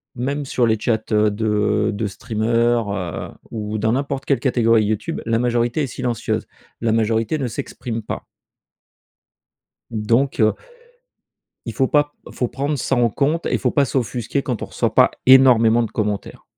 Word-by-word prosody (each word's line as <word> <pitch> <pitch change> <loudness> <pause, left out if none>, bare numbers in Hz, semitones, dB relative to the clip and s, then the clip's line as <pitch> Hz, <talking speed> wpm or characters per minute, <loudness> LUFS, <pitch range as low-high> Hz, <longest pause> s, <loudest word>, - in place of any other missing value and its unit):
même 140 +4 -2
sur 125 -2 +1
les 110 0 +2
chats 115 +1 +1
de 105 0 +1
de 100 +1 -2
streamer, 115 +3 0
heu, 85 -5 -4 0.2
ou 110 -1 -4
dans 110 +1 +1
n'importe 140 +1 -2
quelle 140 - +1
catégorie 115 -4 +3
YouTube. 105 0 -2
La 115 0 +1
majorité 120 +3 0
est - - -1
silencieuse. 120 -2 -2 0.4
La 115 -1 +1
majorité 115 +4 +1
ne 135 -4 -2
s'exprime 115 0 -5
pas. - - -5 1.7
Donc, 115 +6 0
heu 110 -1 +4 1.1
il 115 - -5
faut 130 - +1
pas 145 +1 +2 0.2
faut 125 - -2
prendre 140 +4 -2
ça 135 - 0
en 120 -1 +3
compte 150 +8 0
et - - -1
il - - +1
faut - - 0
pas 145 -2 +3
s'offusquer 125 +1 -2
quand 125 -5 -3
on - - -2
reçoit - - -2
pas - - +5
énormément 120 -3 +6
de 115 - -5
commentaires. 105 -2 -3
115 Hz, 165 wpm, -20 LUFS, 110-130 Hz, 1.7 s, énormément